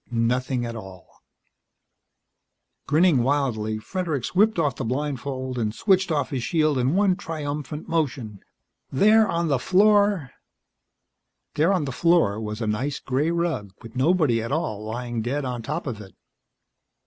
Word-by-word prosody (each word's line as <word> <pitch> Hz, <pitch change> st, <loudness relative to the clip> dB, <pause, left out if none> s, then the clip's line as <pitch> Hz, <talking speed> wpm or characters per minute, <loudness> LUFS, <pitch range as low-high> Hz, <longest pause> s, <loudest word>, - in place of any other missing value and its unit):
Nothing 125 Hz, +1 st, 0 dB
at 115 Hz, 0 st, -5 dB
all. 95 Hz, -5 st, -10 dB, 1.8 s
Grinning 155 Hz, -2 st, +4 dB
wildly, 120 Hz, -5 st, 0 dB
Fredericks 155 Hz, -, -3 dB
whipped 210 Hz, +3 st, +3 dB
off 145 Hz, -6 st, +1 dB
the -, -, -4 dB
blindfold 130 Hz, 0 st, -3 dB
and 110 Hz, -1 st, -2 dB
switched 190 Hz, -3 st, +2 dB
off 145 Hz, -4 st, 0 dB
his 130 Hz, -3 st, -2 dB
shield 155 Hz, -1 st, +1 dB
in 130 Hz, +6 st, +1 dB
one 195 Hz, -2 st, +3 dB
triumphant 150 Hz, -4 st, -5 dB
motion. 125 Hz, -, -2 dB, 0.5 s
There, 215 Hz, +8 st, +4 dB
on 170 Hz, -1 st, 0 dB
the 140 Hz, -4 st, +1 dB
floor 200 Hz, -, +3 dB, 1.2 s
There, 160 Hz, +5 st, +2 dB
on 185 Hz, -6 st, +1 dB
the 135 Hz, -, -3 dB
floor, 165 Hz, -9 st, +2 dB
was 105 Hz, +1 st, -5 dB
a -, -, -1 dB
nice 130 Hz, +7 st, -2 dB
gray 135 Hz, +4 st, 0 dB
rug 170 Hz, -, -2 dB
with 115 Hz, +1 st, -11 dB
nobody 140 Hz, -4 st, +2 dB
at 115 Hz, -, -5 dB
all 110 Hz, -9 st, -2 dB
lying 120 Hz, +1 st, -4 dB
dead 135 Hz, +5 st, -2 dB
on 125 Hz, -2 st, -3 dB
top 150 Hz, +9 st, -4 dB
of 115 Hz, -6 st, -5 dB
it. 95 Hz, -2 st, -13 dB
140 Hz, 150 wpm, -24 LUFS, 120-165 Hz, 1.8 s, Grinning